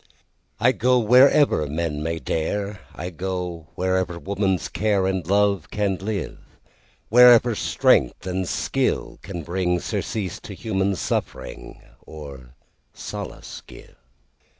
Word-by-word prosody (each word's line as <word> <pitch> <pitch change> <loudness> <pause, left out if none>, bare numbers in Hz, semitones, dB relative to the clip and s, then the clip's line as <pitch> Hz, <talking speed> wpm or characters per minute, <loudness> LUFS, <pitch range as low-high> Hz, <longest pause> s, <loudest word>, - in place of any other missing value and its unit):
I 120 +3 +4
go 125 +1 +2
wherever 125 - +5
men 75 0 -3
may 80 +1 -2
dare,I 90 +2 -4
go 90 -2 -4
wherever 95 -1 -1
woman's 95 -1 -1
careAnd 95 -4 0
love 100 -3 +2
can 100 -3 -1
live, 100 -2 -4 0.7
Wherever 120 0 +7
strength 105 - +2
and 95 -1 -2
skill - - -1
can 85 -3 -7
bringSurcease 90 +2 -2
to - - -9
human 100 -2 -1
suffering, 70 - -4 0.2
Or 70 -5 -11 0.4
solace - - -7
give. - - -14
95 Hz, 105 wpm, -23 LUFS, 85-105 Hz, 0.7 s, Wherever